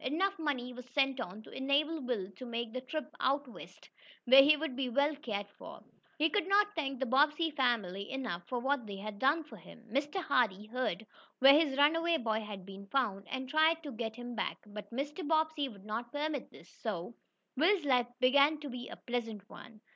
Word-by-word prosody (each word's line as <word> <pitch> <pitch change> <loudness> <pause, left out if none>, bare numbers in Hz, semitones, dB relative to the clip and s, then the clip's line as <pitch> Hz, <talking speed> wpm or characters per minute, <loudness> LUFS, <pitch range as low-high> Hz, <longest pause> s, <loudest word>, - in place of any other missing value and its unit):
Enough 375 +8 0
money 255 -5 -2
was 250 0 -10
sent 270 -1 +1
on 215 -1 -6
to - - -14
enable 290 +4 0
Will 225 -7 -3
to - - -9
make 235 -1 -4
the 255 - -3
trip 305 +4 -4
out 280 +1 +1
west, 245 - -13 0.4
where 265 +2 +9
he 300 +2 +6
would 295 -4 -3
be 265 -1 -1
well 285 +5 +2
cared 210 -8 -3
for. - - -10 0.4
He 310 +1 +4
could 365 +1 0
not 410 +1 +3
thank 275 -5 -2
the 265 - 0
Bobbsey 300 +6 +3
family 220 -8 0
enough 250 -10 -3
for 250 - -2
what 265 -1 0
they 200 - -6
had 205 +1 -7
done 290 +5 +3
for 300 - -13
him. 235 - -15
Mr. 285 - -1
Hardee 220 - +1
heard 225 -4 -2 0.3
where 270 +1 +8
his 290 -2 +3
runaway 330 +3 +4
boy 220 -4 -1
had 205 -3 -8
been 195 0 -10
found, 200 -5 -1
and 260 0 -4
tried 315 +3 +3
to 290 - -6
get 225 -2 -4
him 245 0 -7
back, - - -2
but 210 0 -9
Mr. 290 +6 -4
Bobbsey 315 -2 +1
would 200 -4 -14
not 230 +3 -4
permit 295 -2 -3
this. 170 - -16
So 205 -1 -4 0.4
Will's 340 +4 +3
life 250 -3 +3
began 280 +4 +5
to 290 - -6
be 245 -1 -7
a - - -7
pleasant 225 -4 -4
one. 220 -2 -13
260 Hz, 205 wpm, -33 LUFS, 225-295 Hz, 0.4 s, where